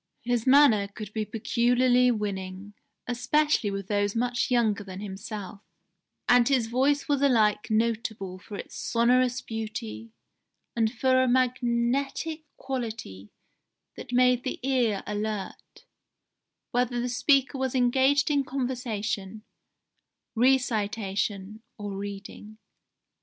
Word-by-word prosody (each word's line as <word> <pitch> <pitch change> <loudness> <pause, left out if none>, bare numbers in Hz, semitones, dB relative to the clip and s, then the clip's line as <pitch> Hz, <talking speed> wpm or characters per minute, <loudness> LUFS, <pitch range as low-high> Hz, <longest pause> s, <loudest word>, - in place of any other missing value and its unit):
His 240 0 -1
manner 255 -7 +6
could 210 +1 -9
be 220 -1 -2
peculiarly 245 +3 +2
winning, 200 -3 -4 0.3
especially 255 0 +1
with 195 -1 -4
those 205 0 0
much 245 +2 0
younger 225 -5 +1
than 190 -1 -8
himself, 200 0 -7 0.7
and 245 -1 +5
his 260 -4 +2
voice 270 +5 +1
was 285 -2 +1
alike 220 -7 +3
notable 220 -4 -1
for 200 +1 -9
its - - -9
sonorous 245 +1 +2
beauty 115 - -6 0.6
and 225 -2 +1
for 260 +2 +2
a 260 - +2
magnetic 255 +5 0
quality 225 - -5 0.7
that 250 - -9
made 250 0 +3
the 260 - -4
ear 240 -7 +1
alert, 210 -1 -5 0.9
whether 245 0 0
the 245 - -1
speaker 275 +2 +2
was 265 -1 -1
engaged 265 +3 +3
in 285 -1 +2
conversation, 225 -6 -3 0.9
recitation, 215 -4 0 0.2
or 205 -2 -5
reading. 200 +2 -8
235 Hz, 110 wpm, -27 LUFS, 205-255 Hz, 0.9 s, manner